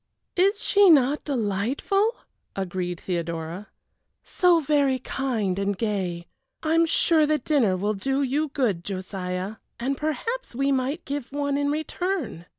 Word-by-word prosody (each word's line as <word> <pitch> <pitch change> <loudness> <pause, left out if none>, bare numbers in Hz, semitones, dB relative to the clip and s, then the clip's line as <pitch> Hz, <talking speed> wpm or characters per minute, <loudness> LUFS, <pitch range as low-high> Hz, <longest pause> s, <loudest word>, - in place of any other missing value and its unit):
"Is 395 +3 +2
she 405 -2 +5
not 285 -2 +4
delightful?" 275 - 0 0.4
agreed 180 -2 -3
Theodora; 170 +2 -4 0.6
"so 355 -2 +3
very 285 -3 +2
kind 225 -9 -2
and 200 0 -1
gay. 185 -6 -2 0.4
I 315 0 +1
am 330 0 +4
sure 315 -1 +3
the 305 0 +3
dinner 250 -9 +2
will 205 +3 0
do 270 +7 -1
you 285 +4 0
good, 240 - -1
Josiah, 185 +1 -4 0.2
and 265 +4 -1
perhaps 385 - -3
we 275 +2 +1
might 270 +5 -1
give 280 -3 -4
one 285 0 -1
in 285 0 +1
return. 310 - -3
265 Hz, 140 wpm, -25 LUFS, 195-305 Hz, 0.6 s, she